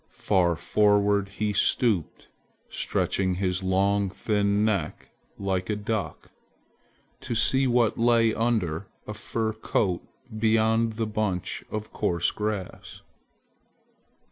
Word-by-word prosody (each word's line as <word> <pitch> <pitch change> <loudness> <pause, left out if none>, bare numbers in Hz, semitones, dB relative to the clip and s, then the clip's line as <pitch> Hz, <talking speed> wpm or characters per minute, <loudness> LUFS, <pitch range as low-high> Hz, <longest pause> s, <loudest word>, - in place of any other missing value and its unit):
Far 90 -4 +2
forward 100 +3 +2
he 105 +1 -2
stooped, 100 - +1 0.4
stretching 95 -2 -1
his 90 0 -1
long 100 +1 +1
thin 105 +1 0
neck 100 -8 -2 0.3
like 95 -1 -2
a 105 - +1
duck, 105 0 -4 0.9
to 120 - -4
see 130 +4 +3
what 120 -3 +2
lay 115 -1 +4
under 105 -7 -1 0.2
a 105 - -6
fur 110 0 -3
coat 100 -4 -1 0.3
beyond 110 +1 +2
the 110 +1 -2
bunch 105 -4 -2
of 110 0 -6
coarse 85 0 0
grass. 105 -3 -5
105 Hz, 110 wpm, -26 LUFS, 95-110 Hz, 0.9 s, lay